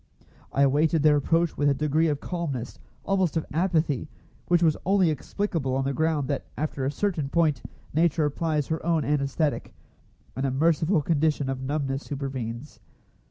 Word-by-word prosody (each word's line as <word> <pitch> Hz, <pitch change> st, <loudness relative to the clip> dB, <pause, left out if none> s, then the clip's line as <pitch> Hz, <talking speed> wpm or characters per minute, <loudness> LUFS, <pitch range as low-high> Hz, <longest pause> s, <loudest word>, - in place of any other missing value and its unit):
I 140 Hz, -, +3 dB
awaited 150 Hz, +3 st, +3 dB
their 150 Hz, -1 st, +6 dB
approach 165 Hz, +3 st, +1 dB
with 145 Hz, 0 st, +3 dB
a 140 Hz, -, +2 dB
degree 150 Hz, +3 st, +1 dB
of 145 Hz, -2 st, 0 dB
calmness, 145 Hz, -9 st, -4 dB, 0.3 s
almost 190 Hz, -5 st, +1 dB
of 160 Hz, -, -1 dB
apathy, 160 Hz, -5 st, 0 dB, 0.4 s
which 175 Hz, 0 st, +3 dB
was 160 Hz, -2 st, +4 dB
only 190 Hz, -3 st, +3 dB
explicable 150 Hz, -2 st, -2 dB
on 135 Hz, -, 0 dB
the 140 Hz, -, 0 dB
ground 155 Hz, -1 st, 0 dB
that 140 Hz, -2 st, -3 dB
after 145 Hz, -3 st, -2 dB
a 135 Hz, -, 0 dB
certain 165 Hz, -5 st, -1 dB
point 155 Hz, -5 st, +2 dB, 0.3 s
Nature 160 Hz, 0 st, +2 dB
applies 150 Hz, 0 st, -1 dB
her 160 Hz, 0 st, -2 dB
own 165 Hz, -2 st, +1 dB
anæsthetic, 145 Hz, +1 st, -1 dB, 0.6 s
and 130 Hz, -, -3 dB
a -, -, 0 dB
merciful 160 Hz, +4 st, +2 dB
condition 150 Hz, -3 st, +1 dB
of 130 Hz, -1 st, -4 dB
numbness 135 Hz, 0 st, -2 dB
supervenes. 135 Hz, -2 st, -5 dB
150 Hz, 160 wpm, -26 LUFS, 140-165 Hz, 0.6 s, their